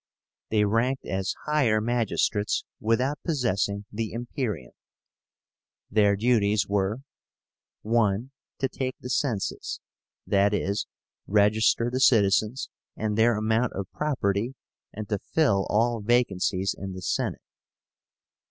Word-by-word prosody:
They 105 -1 +3
ranked 115 +6 0
as 95 0 -2
higher 135 -8 +2
magistrates 110 -2 0
without 125 +6 +1
possessing 105 - 0
the 110 0 -3
imperium. 115 - -4 1.2
Their 100 -1 +4
duties 105 -2 +2
were: 100 +4 0 0.8
(1) 115 +2 +1 0.3
To 135 - +2
take 130 -1 -4
the 125 - -6
census, 120 -10 -2 0.5
i.e. 100 0 +2 0.5
register 110 +3 +3
the 130 - -1
citizens 110 +1 +3 0.2
and 105 -1 -2
their 115 +1 +4
amount 110 +3 +1
of 95 -1 -5
property, 125 -5 -1 0.4
and 105 0 -6
to 105 - 0
fill 100 -11 +1
all 115 +1 +2
vacancies 100 -4 +1
in 95 -1 -6
the 95 0 -8
Senate. - - -2
110 Hz, 110 wpm, -26 LUFS, 100-120 Hz, 1.2 s, Their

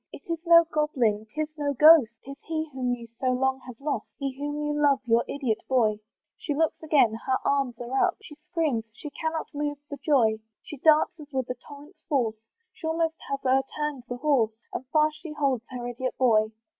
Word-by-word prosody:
It - - -11
is 335 -1 -2
no 335 0 +8
goblin, 250 -10 0
'tis 305 0 -1
no 285 -1 0
ghost, 305 -3 +8 0.2
'Tis 275 +1 -9
he 320 -1 -2
whom 250 -2 -1
you 235 -1 -11
so 260 - -1
long 265 +1 +1
have 245 -3 -10
lost, 290 +1 -3
He 275 -2 -3
whom 290 +1 -4
you 295 - -1
love, 280 -2 +4
your 235 0 +3
idiot 255 -6 -1
boy. 220 -5 +2 0.4
She 295 - -3
looks 320 +1 0
again 295 -8 +3
her 260 - +3
arms 270 -4 0
are 260 +8 +1
up 360 - -4
She - - -11 0.2
screams 295 -10 0
she 295 +5 -9
cannot 320 +1 -4
move 290 0 -2
for 285 - -6
joy; 235 -8 +3 0.2
She 295 - -9
darts 310 +4 +4
as 295 -1 -12
with 260 -2 -2
a - - -3
torrent's 290 +5 -13
force, 240 -7 +1 0.4
She 320 - -7
almost 325 0 0
has 275 -1 -3
o'erturned 270 +1 0
the 245 - -4
horse, 245 -6 +2 0.2
And 260 - -5
fast 305 +2 +2
she 320 -3 -7
holds 270 -6 0
her 245 -1 -5
idiot 250 +1 -4
boy. 220 -4 +4
275 Hz, 200 wpm, -26 LUFS, 245-305 Hz, 0.4 s, no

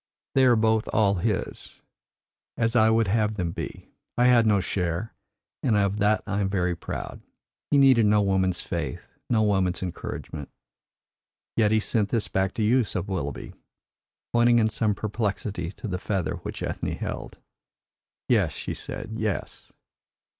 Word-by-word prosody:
They 135 -1 +5
are 125 -2 +6
both 110 0 +2
all 100 -3 +3
his, 100 +2 -3 0.7
as 115 +1 +1
I 110 -1 +5
would 110 -1 +3
have 105 +1 +1
them 90 -4 -2
be. - - -7 0.3
I 120 - +4
had 120 -2 +5
no 105 -2 +4
share, 90 +2 -2 0.5
and 115 -5 +2
of 100 0 +1
that 105 +1 +2
I 105 0 -1
am 95 - 0
very 90 -3 0
proud. 85 - -6 0.5
He 145 - +4
needed 130 -5 +6
no 105 0 +4
woman's 95 -2 +1
faith, 85 -8 -4 0.2
no 110 -2 +3
woman's 95 -3 +1
encouragement." 80 -4 -6 1.1
"Yet 110 -2 +3
he 110 - +4
sent 105 -1 0
this 115 -1 0
back 95 0 -1
to 110 - 0
you," 120 +4 +4
said 95 -3 -3
Willoughby, 80 -8 -4 0.8
pointing 120 0 +5
in 110 -1 +3
some 105 -1 0
perplexity 100 -4 -3
to - - -7
the 90 -2 -3
feather 90 -5 -2
which 85 - -6
Ethne - - -3
held. - - -6 0.9
"Yes," - - +2
she - - -5
said, - - -6
"yes. - - -4
105 Hz, 155 wpm, -26 LUFS, 95-110 Hz, 1.1 s, are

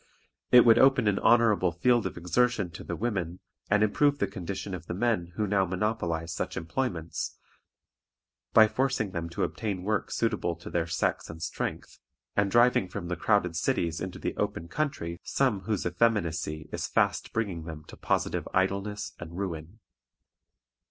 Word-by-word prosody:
It 125 -1 +8
would 115 -1 +7
open 135 -4 +5
an 100 -1 +2
honorable 110 -6 +4
field 120 +7 +2
of - - -8
exertion 100 +2 +1
to 85 - -9
the - - -4
women, 95 -6 -2 0.3
and 105 +1 +4
improve 145 +7 +3
the 100 - +1
condition 95 0 -5
of 90 -2 -7
the 85 - -3
men 100 -5 0
who 105 - 0
now 100 -1 +2
monopolize 90 -4 -2
such 90 +1 -4
employments, 85 -2 -3 1.1
by 110 -1 +7
forcing 125 -4 0
them 85 -2 -4
to 85 - -2
obtain 100 -5 -3
work 105 +1 -1
suitable 105 -7 0
to 85 - -10
their 85 -1 0
sex 85 - -1
and 80 - -8
strength, 85 - -4 0.4
and 100 -1 +2
driving 120 -3 +4
from 90 -1 -6
the 90 - -1
crowded 90 -1 +1
cities 85 0 0
into 95 -1 -5
the - - -3
open 85 - -2
country 85 - -3
some 130 -7 +1
whose 105 -3 -1
effeminacy 85 -6 0
is - - -3
fast - - +1
bringing 95 -8 -2
them 80 -2 -7
to - - -12
positive - - -1
idleness 100 +2 0
and 85 0 -8
ruin. 85 -1 -5
95 Hz, 165 wpm, -28 LUFS, 85-110 Hz, 1.1 s, It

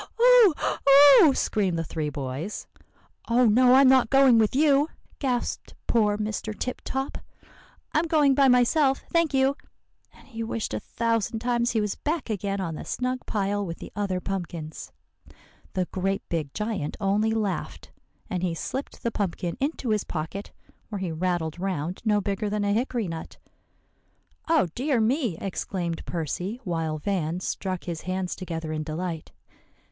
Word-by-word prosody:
"Oh! 485 -6 +7 0.3
oh!" 280 +1 +8
screamed 195 -6 0
the 165 - -1
three 155 -1 -3
boys. 140 +7 -5 0.6
"'Oh! 245 +2 +4
no, 250 +3 +6
I'm 270 0 +7
not 260 -3 +5
going 270 -4 +6
with 220 +2 +2
you,' 290 +1 +4 0.3
gasped 250 -4 -2
poor 210 -3 +2
Mr. 215 0 -4
Tip 255 - -4
Top; 265 +1 -3 0.7
'I'm 315 +2 +2
going 300 -4 +4
by 275 0 +4
myself, 265 +3 +3
thank 335 -2 +2
you.' 270 +1 +2 0.6
And - - -20
he 230 -3 -7
wished 225 - -3
a 110 - -1
thousand 230 - -1
times 240 +1 0
he 225 - +1
was 210 -1 -1
back 300 -6 -2
again 200 -1 -2
on 170 -4 -3
the - - -6
snug 255 0 -3
pile 205 -1 -1
with 170 -3 -5
the - - -10
other 195 -3 -1
pumpkins. 170 -5 -5 0.8
"The 185 -2 0
great 195 +1 -2
big 155 -5 -2
giant 210 -8 -3
only 205 +2 +1
laughed; 210 -5 -3 0.4
and 180 - -3
he 175 -2 -1
slipped 265 - -5
the 235 - 0
pumpkin 180 -4 -2
into 275 -3 -2
his 215 -2 +1
pocket, 165 +5 -5 0.4
where 210 - -4
he 190 -3 -3
rattled 170 -1 -2
round 180 -2 -3
no 210 -2 +3
bigger 200 +2 -2
than 210 0 -1
a 200 0 +1
hickory 235 -1 -1
nut." 165 -1 -7 1.1
"Oh, 320 - +4
dear 265 -1 0
me!" 230 - +1
exclaimed 175 -3 -4
Percy, 175 - -3
while 165 -5 -2
Van 170 0 -2
struck 185 0 -3
his 170 -3 -5
hands 185 0 -3
together 165 -4 -5
in 155 - -2
delight. 160 +1 -5
205 Hz, 160 wpm, -26 LUFS, 175-250 Hz, 1.1 s, oh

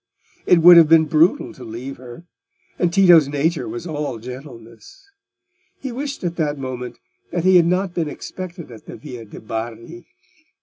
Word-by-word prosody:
It 175 -3 +4
would 175 0 +10
have 165 -2 +7
been 160 -1 +6
brutal 160 +3 +2
to 130 - -13
leave 120 +4 -8
her, 125 +5 -12 0.6
and 175 -1 +1
Tito's 175 -5 +6
nature 150 +4 -1
was 175 +1 -7
all 150 -6 -4
gentleness. 120 - -12 0.7
He 265 - -6
wished 280 +1 -6
at 170 -1 -3
that 150 -3 -1
moment 125 -2 -6 0.3
that 175 -1 -2
he 185 0 +5
had 170 -1 +4
not 180 +1 -1
been 165 -4 -2
expected 175 -1 -9
in 110 -2 -12
the - - -9
Via 125 -6 -10
de' 105 - -12
Bardi. 115 +10 -7
155 Hz, 170 wpm, -20 LUFS, 125-175 Hz, 0.7 s, would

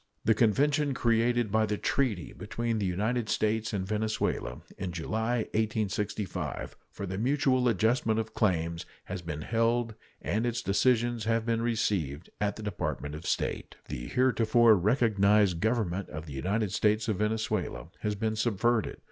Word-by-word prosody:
The 110 - +5
convention 140 - +2
created 120 -1 +2
by 110 +1 +3
treaty 105 -1 -1
between 115 +1 -3
the 100 - 0
United 110 +5 -1
States 110 +1 0
and 95 -3 -2
Venezuela 105 - -2
in 95 -2 -4
July, 110 +8 -1
1865, 105 -2 -2
for 100 - -6
the 95 +1 -4
mutual 130 0 +2
adjustment 110 +1 +2
of 110 0 -4
claims, 85 -5 0 0.2
has 95 -1 -5
been 75 -3 -5
held, 115 0 +1 0.3
and 110 +3 -1
its 120 0 -2
decisions 120 +2 +2
have 115 0 +1
been 115 -1 0
received 95 - -1
at 105 -1 0
the 110 - -8
Department 85 -7 -3
of 75 +2 -7
State. - - -2
The - - -5
heretofore 120 - +4
recognized 105 -3 +3
Government 100 -3 0
of 75 +1 -6
the 75 - -8
United 100 +8 -1
States 105 +1 +2
of 110 -4 0
Venezuela 105 -5 -1
has 105 -1 -1
been 110 +1 -1
subverted. 115 0 +1
110 Hz, 150 wpm, -29 LUFS, 100-115 Hz, 0.3 s, The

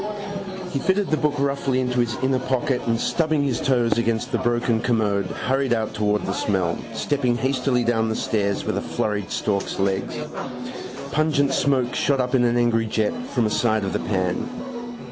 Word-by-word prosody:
He 140 - -1
fitted 190 +4 +1
the 155 - +3
book 150 -1 +1
roughly 140 -2 +1
into 125 -1 0
his 120 0 +1
inner 130 0 +2
pocket 130 +1 0
and, 115 0 +2
stubbing 155 -1 +1
his 130 -4 0
toes 120 -3 +2
against 115 -1 0
the - - +1
broken 120 -1 +1
commode, 105 -5 +1
hurried 135 +5 0
out 110 -2 -1
towards 105 0 +1
the - - -1
smell, 95 -5 0 0.2
stepping 125 -1 +1
hastily 130 0 +1
down 115 -1 +1
the 110 - -1
stairs 100 -3 0
with - - -1
a - - 0
flurried 105 -2 -2
stork's 100 -2 -1
legs. 95 0 0 1.0
Pungent 145 -3 +2
smoke 130 -3 +2
shot 140 -2 +1
up 125 0 0
in 130 -2 +4
an 120 0 +2
angry 115 -2 +2
jet 110 -1 +1
from 120 -4 +1
a 105 - 0
side 110 -2 +2
of 95 - -2
the - - 0
pan. 95 - -1
120 Hz, 185 wpm, -23 LUFS, 110-135 Hz, 1.0 s, in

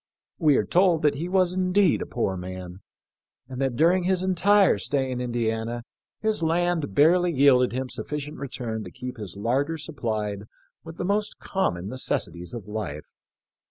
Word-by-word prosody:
We 150 -5 +4
are - - +2
told 175 -3 +3
that 150 -1 +4
he 160 +5 -4
was 185 -1 +2
indeed 185 0 +2
a - - -4
poor 100 -6 -1
man, 90 0 -7 0.7
and 130 0 -6
that 135 -3 0
during 175 +6 +3
his 185 0 +1
entire 195 +2 +4
stay 135 -2 -1
in 125 0 -3
Indi 120 -2 0
ana 115 +1 -4 0.4
hig 215 -4 +1
land 165 - 0
barely 175 +4 +5
yielded 135 -4 +4
him 130 +2 -3
sufficient 150 +3 -5
return 120 -5 -4
to 90 - -8
keep 125 +5 -7
his 100 -5 -7
larder 135 +9 0
supplied 110 -9 -3 0.4
with 165 0 -10
the - - -3
most 205 +2 -1
common 95 - -2
necessities 90 -6 -3
of 110 -4 -8
life. 105 -9 -5
135 Hz, 165 wpm, -25 LUFS, 110-175 Hz, 0.7 s, barely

